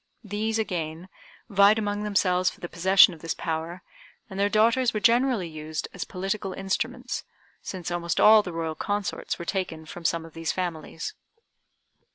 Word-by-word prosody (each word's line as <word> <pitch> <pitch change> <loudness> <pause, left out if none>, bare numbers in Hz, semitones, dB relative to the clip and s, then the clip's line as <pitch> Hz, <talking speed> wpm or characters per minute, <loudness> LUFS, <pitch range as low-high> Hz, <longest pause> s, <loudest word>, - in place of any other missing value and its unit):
These, 215 +2 -2
again, 175 -4 -3 0.4
vied 200 0 +5
among 205 -1 -1
themselves 185 -3 +2
for - - -14
the 175 - -5
possession 190 +2 +6
of 165 - -12
this 165 - -3
power, 165 +2 -4 0.5
and 190 - -5
their 200 +1 +3
daughters 230 +3 +3
were - - +1
generally 235 -3 +3
used 155 -1 -5
as - - -4
political 195 +1 -3
instruments, 245 +7 -3 0.4
since 180 -2 -6
almost 170 -1 -1
all 215 0 +8
the 185 - -6
Royal 165 -1 -3
consorts 205 +4 -3
were 170 - -7
taken 165 -4 -3
from 170 +2 -9
some 165 0 0
of 165 - -13
these 165 -1 -2
families. 165 -3 -4
185 Hz, 165 wpm, -26 LUFS, 165-210 Hz, 0.5 s, all